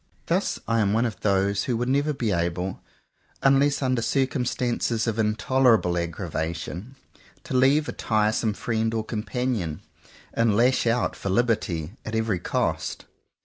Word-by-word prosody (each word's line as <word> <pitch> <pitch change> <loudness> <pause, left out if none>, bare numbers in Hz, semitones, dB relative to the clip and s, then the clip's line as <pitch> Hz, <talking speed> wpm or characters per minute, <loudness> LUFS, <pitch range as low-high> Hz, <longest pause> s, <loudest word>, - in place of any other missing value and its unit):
Thus - - 0
I 115 0 +2
am 100 -2 +2
one 115 +3 +2
of 115 -3 -4
those 100 0 +1
who 125 -4 0
would 120 +1 -1
never 140 +3 +2
be 125 -7 -1
able, 90 +1 -2 0.6
unless 140 +1 +3
under 130 -2 +1
circumstances 125 -3 0
of 115 -1 -1
in 105 -1 +2
tolerable 115 -7 +3
aggravation, 85 - -4 0.5
to - - -6
leave 135 +4 +4
a - - -2
tiresome 110 0 0
friend 110 0 -1
or 110 - 0
companion, 110 - -2 0.5
and 115 -3 +2
lash 125 +1 +3
out 120 +1 +1
for 100 - -4
liberty 95 -5 0
at 110 - -4
every 110 -4 0
cost. - - -2
110 Hz, 145 wpm, -25 LUFS, 100-125 Hz, 0.6 s, leave